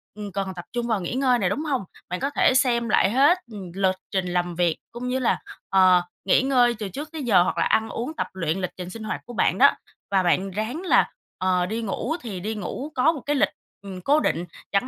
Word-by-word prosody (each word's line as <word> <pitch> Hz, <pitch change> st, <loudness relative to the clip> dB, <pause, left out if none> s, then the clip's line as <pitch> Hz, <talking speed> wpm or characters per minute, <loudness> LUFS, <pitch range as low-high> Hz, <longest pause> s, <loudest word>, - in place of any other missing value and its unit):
ừm, 210 Hz, -1 st, -6 dB
cần 195 Hz, 0 st, -3 dB
tập 175 Hz, -1 st, -8 dB
trung 240 Hz, -1 st, -2 dB
vào 220 Hz, -4 st, 0 dB
nghỉ 175 Hz, -, -4 dB
ngơi 255 Hz, -1 st, +2 dB
nè, 185 Hz, -, +1 dB
đúng 270 Hz, +10 st, -2 dB
hông? 270 Hz, -7 st, 0 dB, 0.3 s
Bạn 180 Hz, +1 st, -3 dB
có 275 Hz, -, -1 dB
thể 285 Hz, -, +3 dB
xem 240 Hz, -3 st, +2 dB
lại 200 Hz, -, +3 dB
hết, 280 Hz, +9 st, +5 dB
ừm, 195 Hz, -5 st, -8 dB
lịch 190 Hz, -1 st, +2 dB, 0.2 s
trình 190 Hz, -2 st, 0 dB
làm 175 Hz, -1 st, -1 dB
việc 170 Hz, -2 st, +1 dB
cũng 240 Hz, +1 st, -5 dB
như 255 Hz, +1 st, 0 dB
là, 250 Hz, -, +1 dB, 0.3 s
ờ, 185 Hz, -2 st, +5 dB, 0.2 s
nghỉ 195 Hz, -, +4 dB
ngơi 250 Hz, -3 st, +3 dB
từ 210 Hz, -3 st, -4 dB
trước 290 Hz, -, -7 dB
tới 320 Hz, -3 st, -5 dB
giờ 195 Hz, -8 st, +5 dB
hoặc -, -, -2 dB
là -, -, +2 dB
ăn 220 Hz, 0 st, +2 dB
uống 250 Hz, +7 st, -4 dB
tập -, -, -2 dB
luyện 170 Hz, -2 st, -1 dB
lịch 180 Hz, -, -2 dB
trình 180 Hz, -1 st, -6 dB
sinh 220 Hz, +4 st, -8 dB
hoạt 215 Hz, -, -4 dB
của 240 Hz, -, -9 dB
bạn -, -, +2 dB
đó, -, -, +7 dB, 0.4 s
và 190 Hz, -1 st, +3 dB
bạn 185 Hz, +2 st, +1 dB
ráng 220 Hz, -, -3 dB
là, 370 Hz, -, +3 dB, 0.3 s
ờ, 185 Hz, -1 st, +1 dB
đi 220 Hz, +5 st, -3 dB
ngủ 230 Hz, +7 st, -2 dB
thì 210 Hz, -7 st, -6 dB
đi 215 Hz, +5 st, -3 dB
ngủ 250 Hz, -, -5 dB
có 275 Hz, +5 st, +4 dB
một 300 Hz, -5 st, -6 dB
cái 295 Hz, +3 st, -1 dB
lịch, 275 Hz, -, +3 dB, 0.3 s
ừm, 190 Hz, -2 st, -8 dB
cố 290 Hz, +10 st, +3 dB
định 175 Hz, -, 0 dB, 0.3 s
chẳng 200 Hz, +5 st, +1 dB
215 Hz, 250 wpm, -24 LUFS, 185-255 Hz, 0.4 s, đó